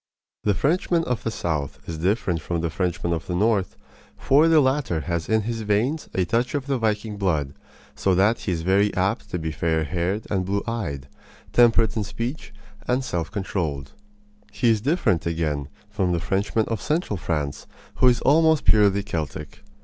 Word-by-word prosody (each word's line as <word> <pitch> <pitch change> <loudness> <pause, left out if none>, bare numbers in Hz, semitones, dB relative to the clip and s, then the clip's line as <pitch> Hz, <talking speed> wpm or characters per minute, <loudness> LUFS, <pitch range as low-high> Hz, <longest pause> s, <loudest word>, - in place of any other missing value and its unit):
The 105 -2 +3
Frenchman 170 - +1
of 125 -6 -2
the - - -2
south 80 -9 -3
is 80 -1 -5
different 90 -2 0
from 85 +2 -2
the 85 -1 -2
Frenchman 85 0 -1
of 80 - -4
the 90 - -2
north, 100 -1 +1 0.4
for 145 +4 +4
the 165 -1 +6
latter 130 - +1
has 85 0 -3
in 110 0 +3
his 115 +1 -3
veins 110 +9 0
a 95 - +2
touch 120 - 0
of 140 -2 -2
the 135 -2 -1
viking 110 -1 -1
blood, 80 -8 0 0.4
so 95 -2 +1
that 105 +5 +3
he 95 - -3
is 80 -2 -2
very 100 +3 +3
apt 95 +1 -1
to - - -2
be 80 -1 -3
fair 80 0 0
haired 90 +6 -2
and 95 -3 +1
blue 100 +2 -1
eyed, 85 - -4 0.5
temperate 115 -2 +4
in 110 - 0
speech, 115 +8 -5 0.4
and 130 +1 +1
self 85 -8 -2
controlled. 80 -9 -3 0.6
He 115 +4 +2
is 110 -2 +1
different, 125 - +1
again, 75 -4 -2 0.2
from 100 -4 -1
the 85 - 0
Frenchman 100 +5 0
of 115 -4 -3
central 155 - -1
France, 75 -4 -3 0.3
who 130 - +4
is 120 -1 +4
almost 160 +2 +4
purely 100 -2 +4
Celtic. 75 -5 -5
100 Hz, 180 wpm, -24 LUFS, 85-115 Hz, 0.6 s, the